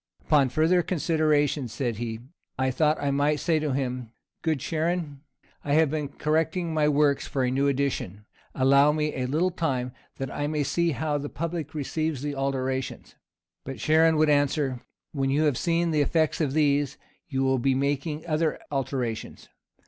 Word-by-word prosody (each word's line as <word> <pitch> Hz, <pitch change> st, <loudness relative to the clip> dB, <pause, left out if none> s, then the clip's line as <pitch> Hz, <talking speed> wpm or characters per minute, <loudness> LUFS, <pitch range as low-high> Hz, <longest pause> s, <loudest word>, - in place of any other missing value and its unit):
"Upon 140 Hz, -4 st, +3 dB
further 160 Hz, +7 st, +3 dB
consideration," 155 Hz, -5 st, +1 dB
said 120 Hz, -1 st, -3 dB
he, 115 Hz, -1 st, -4 dB, 0.4 s
"I 130 Hz, 0 st, +1 dB
thought 155 Hz, +3 st, +2 dB
I 140 Hz, -1 st, 0 dB
might 145 Hz, +2 st, +1 dB
say 165 Hz, 0 st, +1 dB
to 150 Hz, -2 st, -1 dB
him, 125 Hz, -3 st, -2 dB, 0.3 s
'Good 160 Hz, -3 st, 0 dB
Charon, 160 Hz, -1 st, -2 dB, 0.4 s
I 145 Hz, -, -1 dB
have 155 Hz, -1 st, +4 dB
been 150 Hz, -2 st, -2 dB
correcting 160 Hz, +4 st, -1 dB
my 150 Hz, -1 st, +2 dB
works 145 Hz, -1 st, +2 dB
for 135 Hz, -, -1 dB
a 125 Hz, -, +1 dB
new 135 Hz, +2 st, +1 dB
edition. 130 Hz, -8 st, -2 dB, 0.3 s
Allow 140 Hz, +2 st, +5 dB
me 150 Hz, 0 st, -1 dB
a 125 Hz, -1 st, -2 dB
little 165 Hz, +7 st, +1 dB
time, 130 Hz, -8 st, -2 dB, 0.3 s
that 135 Hz, -1 st, -4 dB
I 145 Hz, -, -2 dB
may 150 Hz, -1 st, 0 dB
see 170 Hz, +3 st, +1 dB
how 145 Hz, +3 st, -1 dB
the 145 Hz, +1 st, -5 dB
public 165 Hz, -1 st, -4 dB
receives 155 Hz, -1 st, -2 dB
the 145 Hz, -1 st, -2 dB
alterations.' 135 Hz, -1 st, -3 dB, 0.5 s
But 135 Hz, -1 st, -6 dB
Charon 160 Hz, +6 st, +4 dB
would 155 Hz, -1 st, +4 dB
answer, 145 Hz, -3 st, +1 dB, 0.3 s
'When 135 Hz, -2 st, -1 dB
you 145 Hz, +3 st, +2 dB
have 150 Hz, -4 st, +2 dB
seen 170 Hz, +4 st, +1 dB
the 150 Hz, -2 st, +2 dB
effect 160 Hz, +2 st, +1 dB
of 140 Hz, -4 st, 0 dB
these, 145 Hz, -2 st, +2 dB, 0.3 s
you 135 Hz, -4 st, -1 dB
will 130 Hz, -1 st, +2 dB
be 135 Hz, +2 st, +2 dB
for 135 Hz, -, 0 dB
making 145 Hz, +2 st, -2 dB
other 155 Hz, -1 st, 0 dB
alterations. 130 Hz, -5 st, -3 dB
145 Hz, 175 wpm, -26 LUFS, 135-155 Hz, 0.5 s, Allow